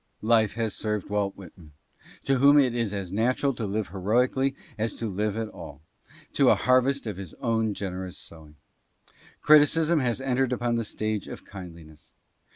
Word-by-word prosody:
Life 110 -2 +3
has 115 -2 -2
served 105 -2 -3
Walt 100 -1 -1
Whitman, 85 -5 -14 0.5
to 135 -1 +1
whom 140 +2 +6
it 130 -4 +4
is 115 -4 -1
as 100 -3 -5
natural 125 +6 +1
to 115 -3 -4
live 105 +1 -2
heroically 125 +8 +1 0.2
as 110 +1 -2
to 115 - -5
live 105 +1 -2
at 115 -1 -2
all, 75 -6 -11 0.5
to - - +4
a - - +6
harvest 130 +2 +2
of 105 -5 -5
his 95 -5 -8
own 110 -4 -1
generous 95 -2 -5
sowing. 80 -2 -12 0.9
Criti 150 -1 +7
cism 165 -1 +1
has 120 -1 0
entered 135 -1 0
upon 120 -1 -1
the 115 - -1
stage 110 -1 -3
of - - -9
kindliness. 85 -5 -12
110 Hz, 170 wpm, -26 LUFS, 95-125 Hz, 0.9 s, Criti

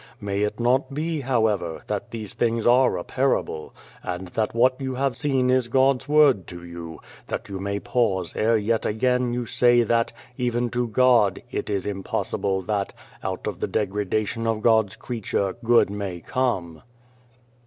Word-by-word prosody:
May 100 0 -2
it 105 +2 -1
not 130 +3 +1
be, 155 0 -2
however, 110 -10 0
that - - -3
these 110 -3 -7
things 115 -1 0
are 125 -4 +4
a 85 - -4
parable; 130 - -1 0.3
and 90 0 -5
that 110 +4 -2
what 130 +3 +3
you 130 -1 -3
have 135 -1 0
seen 135 -4 +1
is 130 -2 +2
God's 135 +2 +2
word 145 - +4
to 85 -1 -9
you, 85 -2 -8 0.3
that - - -4
you 95 -1 -5
may 100 +1 -2
pause 100 -8 0
ere 115 +1 +3
yet 110 +1 0
again 125 +3 +1
you 120 0 -2
say 120 +1 +4
that, 115 +1 +1 0.3
even 120 -1 0
to 120 0 0
God, 120 -4 +3
it - - -3
is 100 -3 -1
impossible 95 -1 -2
that, 100 0 -2 0.3
out - - -4
of - - -4
the - - -1
degradation 105 +2 -1
of 110 -1 -1
God's 110 -4 +3
creature, 100 -5 -2
good 115 -4 +4
may 100 -4 -4
come 90 -7 -2
115 Hz, 165 wpm, -24 LUFS, 100-125 Hz, 0.3 s, are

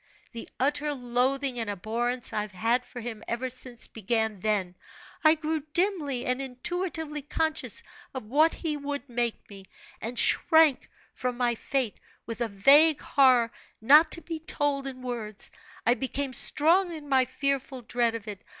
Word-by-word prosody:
The 230 -2 -8
utter 290 +2 0
loathing 255 +1 0
and 225 -2 -2
abhorrence 230 +5 -1
I 210 - 0
have 210 -2 -7
had 230 +6 +1
for 245 - -10
him 225 -2 -7
ever 250 +2 -3
since, 250 -1 -2
began 220 -1 -2
then 195 -3 -1 0.5
I 310 0 +6
grew 315 0 -2
dimly 320 -10 0
and 250 +2 -1
intuitively 305 +3 -3
conscious 315 +2 -2 0.3
of 260 - -4
what 305 +8 +3
he 315 -3 -3
would 285 -1 -5
make 240 -2 -2
me, 195 -2 -12 0.4
and 235 +2 -5
shrank 320 -4 +4 0.2
from 250 -1 -3
my 245 -1 +1
fate 250 -1 -2 0.3
with 230 +1 -6
a 235 - +1
vague 285 +10 +5
horror 255 -4 +3 0.3
not 295 +8 +6
to 335 - -1
be 330 -2 -5
told 290 -4 -1
in 255 -1 -7
words. 225 -4 -4 0.3
I 240 - +5
became 265 +1 -3
strong 345 +8 +4
in 310 -3 -8
my 265 -2 +3
fearful 265 0 -2
dread 230 0 0
of 225 -1 -7
it. 205 -3 -7
255 Hz, 160 wpm, -27 LUFS, 235-290 Hz, 0.5 s, I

